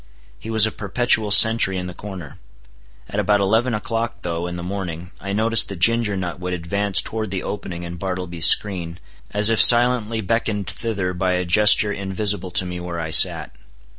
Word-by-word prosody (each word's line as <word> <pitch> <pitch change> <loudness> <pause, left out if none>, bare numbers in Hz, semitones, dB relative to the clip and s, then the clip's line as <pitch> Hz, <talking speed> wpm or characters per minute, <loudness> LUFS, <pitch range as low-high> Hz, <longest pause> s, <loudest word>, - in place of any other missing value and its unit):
He 110 - -10
was 110 -1 +3
a 110 - -3
perpetual 110 +1 -1
sentry 105 -2 +5
in 90 - -5
the 90 - -8
corner. 90 -5 -11 0.7
At - - -5
about 105 -1 +1
eleven 110 +5 0
o'clock 115 +2 -5
though, 85 0 -4
in 90 - -7
the 85 - -7
morning, 90 -2 -7
I 100 - -7
noticed 110 +2 +2
that 100 - -6
Ginger 110 +2 +1
Nut 90 -2 -6
would 90 0 -4
advance 100 +3 +1
toward 110 -2 -5
the 95 -1 -5
opening 90 -4 -7
in 85 0 -8
Bartleby's 90 -2 +1
screen, 90 -4 +1 0.3
as 105 +2 +2
if 115 - +3
silently 120 -2 +4
beckoned 105 -1 -3
thither 100 -4 -4
by 90 +1 -2
a 90 0 -2
gesture 105 +3 +4
invisible 100 -1 -2
to 90 +1 -2
me 90 -1 -7
where 90 -1 -7
I 80 -1 -6
sat. 65 - +4
100 Hz, 185 wpm, -19 LUFS, 90-110 Hz, 0.7 s, sentry